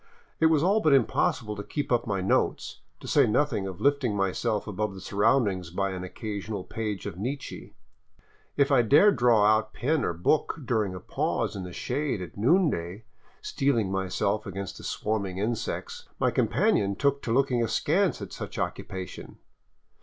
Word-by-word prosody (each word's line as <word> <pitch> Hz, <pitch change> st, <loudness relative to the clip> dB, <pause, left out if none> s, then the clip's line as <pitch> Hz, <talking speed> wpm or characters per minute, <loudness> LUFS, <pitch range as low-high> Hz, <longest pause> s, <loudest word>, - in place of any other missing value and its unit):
It 160 Hz, -, +5 dB
was 160 Hz, -2 st, +3 dB
all 200 Hz, +5 st, +3 dB
but 155 Hz, -8 st, +3 dB
impossible 110 Hz, -3 st, +1 dB
to 100 Hz, -, -5 dB
keep 145 Hz, +8 st, -4 dB
up 120 Hz, -1 st, +1 dB
my 100 Hz, -3 st, -1 dB
notes, 95 Hz, -, 0 dB, 0.2 s
to -, -, -9 dB
say -, -, +4 dB
nothing 115 Hz, -4 st, +1 dB
of 95 Hz, -2 st, -7 dB
lifting 140 Hz, -6 st, +1 dB
myself 100 Hz, +2 st, -1 dB
above 105 Hz, -1 st, -3 dB
the -, -, -8 dB
surroundings 100 Hz, -2 st, +1 dB
by 95 Hz, +3 st, -1 dB
an 90 Hz, -1 st, -5 dB
occasional 100 Hz, +1 st, -5 dB
page 105 Hz, -3 st, -4 dB
of 85 Hz, -, -6 dB
Nietzsche. 135 Hz, +6 st, -5 dB, 0.8 s
If 140 Hz, 0 st, +3 dB
I 135 Hz, -3 st, +6 dB
dared 145 Hz, -, +5 dB
draw 115 Hz, -3 st, +4 dB
out 110 Hz, +1 st, +2 dB
pen 150 Hz, +1 st, 0 dB
or -, -, 0 dB
book 120 Hz, -, 0 dB
during 105 Hz, -7 st, 0 dB
a -, -, -6 dB
pause -, -, -2 dB
in 95 Hz, -2 st, -5 dB
the 90 Hz, -, -8 dB
shade 135 Hz, -, -2 dB
at 90 Hz, -, -8 dB
noonday, 110 Hz, -, +1 dB, 0.4 s
steeling 115 Hz, -8 st, 0 dB
myself 95 Hz, +2 st, -1 dB
against 100 Hz, 0 st, -6 dB
the -, -, -11 dB
swarming 100 Hz, -4 st, -2 dB
insects, 110 Hz, +3 st, -3 dB
my -, -, +2 dB
companion 100 Hz, 0 st, +1 dB
took 140 Hz, +4 st, +1 dB
to 115 Hz, -, -3 dB
looking 125 Hz, -1 st, +2 dB
askance 160 Hz, -, +1 dB
at -, -, -9 dB
such -, -, -7 dB
occupation. 95 Hz, -2 st, -5 dB
110 Hz, 170 wpm, -27 LUFS, 95-135 Hz, 0.8 s, I